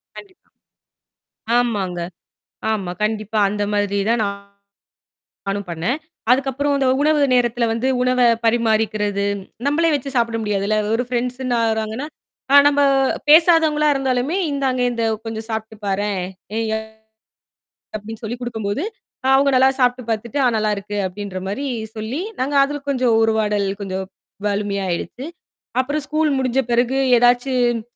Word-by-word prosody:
கண்டிப்பா. 380 Hz, -3 st, -14 dB, 1.1 s
ஆமாங்க. 200 Hz, -7 st, -1 dB, 0.7 s
ஆமா. 195 Hz, -5 st, -2 dB
கண்டிப்பா 215 Hz, 0 st, -1 dB
அந்த 205 Hz, 0 st, -2 dB
மாதிரி 205 Hz, -1 st, 0 dB
தான் 230 Hz, -1 st, +2 dB
நா 200 Hz, -, 0 dB, 1.2 s
நானும் 200 Hz, -1 st, -2 dB
பண்ணேன். 170 Hz, -, -1 dB, 0.3 s
அதுக்கப்புறம் 275 Hz, +2 st, +1 dB
அந்த 270 Hz, -1 st, +1 dB
உணவு 300 Hz, 0 st, +3 dB
நேரத்துல 240 Hz, -1 st, +2 dB
வந்து 230 Hz, +3 st, -1 dB
உணவ 255 Hz, 0 st, +1 dB, 0.3 s
பரிமாறிக்கிறது. 215 Hz, -3 st, +1 dB, 0.4 s
நம்பளே 325 Hz, +3 st, +2 dB
வச்சு 275 Hz, 0 st, -4 dB
சாப்பிட 230 Hz, -1 st, +1 dB
முடியாதுல்ல. 210 Hz, 0 st, 0 dB, 0.2 s
ஒரு 245 Hz, -, 0 dB
ஃபிரண்ட்ஸ்ன்னு 250 Hz, 0 st, -2 dB
ஆகுறாங்கன்னா 220 Hz, +5 st, -1 dB, 0.5 s
அ -, -, +8 dB
நம்ப 285 Hz, 0 st, +3 dB, 0.5 s
பேசாதவங்களா 315 Hz, -2 st, +5 dB
இருந்தாலுமே, 270 Hz, +5 st, 0 dB
"இந்தாங்க 265 Hz, -3 st, 0 dB
இந்த 235 Hz, -1 st, -2 dB, 0.2 s
கொஞ்சம் 225 Hz, 0 st, -4 dB
சாப்பிட்டு 220 Hz, 0 st, -4 dB
பாரேன் 200 Hz, 0 st, -1 dB, 0.4 s
எ -, -, +1 dB, 0.2 s
அ" -, -, -3 dB, 1.2 s
அப்படீன்னு 220 Hz, +2 st, -9 dB
சொல்லிக் 240 Hz, +3 st, -5 dB
குடுக்கும் 225 Hz, -4 st, -4 dB
போது, 255 Hz, +10 st, -1 dB, 0.5 s
அவுங்க 275 Hz, +1 st, +4 dB
நல்லா 260 Hz, +1 st, +6 dB
சாப்பிட்டு 250 Hz, -1 st, +1 dB
பாத்துட்டு, 225 Hz, +5 st, -2 dB
"அ -, -, +4 dB
நல்லா 215 Hz, 0 st, +1 dB
இருக்கு" 205 Hz, +1 st, -6 dB
அப்படீன்ற 185 Hz, 0 st, -6 dB
மாரி 275 Hz, +8 st, -3 dB, 0.3 s
சொல்லி 225 Hz, +9 st, -3 dB, 0.2 s
நாங்க 280 Hz, +3 st, -1 dB
அதுல 290 Hz, +1 st, -1 dB
கொஞ்சம் 250 Hz, -4 st, +2 dB
உரவாடல் 210 Hz, -2 st, +1 dB, 0.2 s
கொஞ்சம் 190 Hz, 0 st, -3 dB, 0.4 s
வலுமையா 200 Hz, -1 st, -1 dB
ஆயிடுச்சு. 245 Hz, -, -4 dB, 0.5 s
அப்புறம் 290 Hz, +3 st, -2 dB
ஸ்கூல் 305 Hz, +1 st, +1 dB
முடிஞ்ச 260 Hz, 0 st, +1 dB
பிறகு 245 Hz, +3 st, +2 dB, 0.2 s
எதாச்சும் 245 Hz, -1 st, +2 dB
235 Hz, 130 wpm, -20 LUFS, 210-265 Hz, 1.2 s, அ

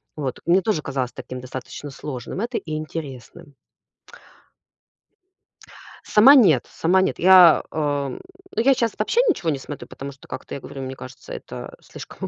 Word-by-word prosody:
Вот. 135 Hz, -5 st, -4 dB
Мне 180 Hz, +3 st, +4 dB
тоже 185 Hz, -6 st, 0 dB
казалось 130 Hz, -3 st, -3 dB
таким 125 Hz, 0 st, -8 dB
достаточно 130 Hz, +3 st, -8 dB
сложным 135 Hz, -, -6 dB
это 240 Hz, +1 st, -2 dB
и 155 Hz, -2 st, -5 dB
интересным. 155 Hz, -1 st, -8 dB, 2.5 s
Сама- 260 Hz, +7 st, +7 dB
нет, 170 Hz, -, +5 dB
сама- 185 Hz, +3 st, +2 dB
нет. 190 Hz, -, -1 dB
Я, 180 Hz, -2 st, +7 dB
эм, 145 Hz, -3 st, -2 dB, 0.3 s
ну, 225 Hz, -, +2 dB
я 270 Hz, +3 st, +5 dB
щас 230 Hz, -3 st, -1 dB
вообще 455 Hz, -, +2 dB
ничего 175 Hz, -, 0 dB
не 140 Hz, -3 st, -1 dB
смотрю, 145 Hz, +1 st, -8 dB
потому 140 Hz, +1 st, -8 dB
что, 135 Hz, -, -17 dB
как-то 130 Hz, -, -8 dB
я -, -, -6 dB
говорю, 135 Hz, -, -8 dB
мне 130 Hz, 0 st, -6 dB
кажется, 130 Hz, 0 st, -11 dB
это -, -, -9 dB
слишком -, -, -9 dB
155 Hz, 155 wpm, -22 LUFS, 135-190 Hz, 2.5 s, Сама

